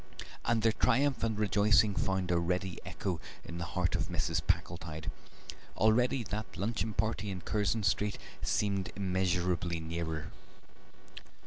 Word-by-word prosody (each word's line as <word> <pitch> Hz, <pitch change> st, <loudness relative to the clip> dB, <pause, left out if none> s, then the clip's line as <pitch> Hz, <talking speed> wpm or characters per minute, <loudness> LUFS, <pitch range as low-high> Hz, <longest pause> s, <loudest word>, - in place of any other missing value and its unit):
And 115 Hz, -1 st, +1 dB
their 115 Hz, -, +5 dB
triumph 140 Hz, +4 st, +2 dB
and 110 Hz, -2 st, 0 dB
rejoicing 105 Hz, 0 st, +4 dB
found 95 Hz, -2 st, 0 dB
a 85 Hz, -, +3 dB
ready 90 Hz, +1 st, -1 dB
echo 90 Hz, -4 st, -3 dB, 0.2 s
in 85 Hz, 0 st, -6 dB
the 85 Hz, -, -2 dB
heart 90 Hz, -1 st, +2 dB
of -, -, 0 dB
Mrs. -, -, 0 dB
Packletide; 80 Hz, -2 st, -1 dB, 0.7 s
already 120 Hz, +4 st, +3 dB
that 105 Hz, -2 st, -5 dB
luncheon 110 Hz, +2 st, -1 dB
party 105 Hz, 0 st, 0 dB
in 95 Hz, -2 st, -4 dB
Curzon 105 Hz, +2 st, 0 dB
Street 100 Hz, +1 st, +1 dB, 0.2 s
seemed 100 Hz, -2 st, 0 dB
immeasurably 90 Hz, -3 st, 0 dB
nearer. 80 Hz, -1 st, -3 dB
95 Hz, 130 wpm, -32 LUFS, 85-110 Hz, 0.7 s, their